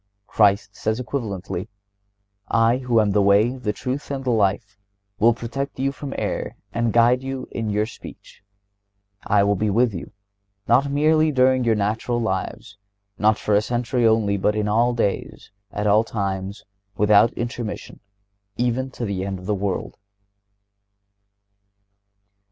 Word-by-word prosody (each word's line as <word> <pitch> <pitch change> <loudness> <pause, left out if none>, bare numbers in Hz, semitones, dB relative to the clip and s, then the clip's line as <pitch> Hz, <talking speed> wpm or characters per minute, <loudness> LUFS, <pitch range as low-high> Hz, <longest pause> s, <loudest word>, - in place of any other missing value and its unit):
Christ 100 -1 +2
says 110 +2 -2
equivalently 110 -7 -4 0.8
I 115 +2 +3
who 125 -3 +1
"am 105 -2 +2
the 105 +1 +3
way, 100 +5 +4
the 125 -5 -2
truth 130 +6 -5
and 135 -1 -4
the 125 - +1
life," 100 -2 0 0.4
will 115 +3 +6
protect 130 +4 -5
you 135 +1 0
from 140 0 -7
error - - -3 0.2
and 115 0 0
will - - +1
guide 120 +2 +4
you 135 -1 -5
in 115 -2 -3
your 105 +1 +1
speech. 110 - -12 0.9
I 100 -1 +4
will 100 0 +3
be 105 +2 0
with 115 +2 +2
you, 85 - -7 0.6
not 140 +2 +3
merely 155 +2 +3
during 130 -1 +3
your 115 -2 +2
natural 110 +4 -1
lives, 100 -1 -4 0.4
not 110 +1 +3
for 105 - -1
a 100 - +5
century 120 +1 0
only, 110 -3 +2
but 105 +2 +1
all 120 +3 +2
days, 100 -3 -3 0.2
at 105 - -3
all 105 +2 +4
times, 100 -2 -4 0.3
without 105 +2 +5
intermission, 120 -2 -5 0.6
even 125 +2 0
to 125 -2 -5
the 100 -3 -3
end 95 -1 -3
of 90 - -11
the 105 - 0
world. 100 -1 -3
110 Hz, 150 wpm, -22 LUFS, 100-125 Hz, 0.9 s, will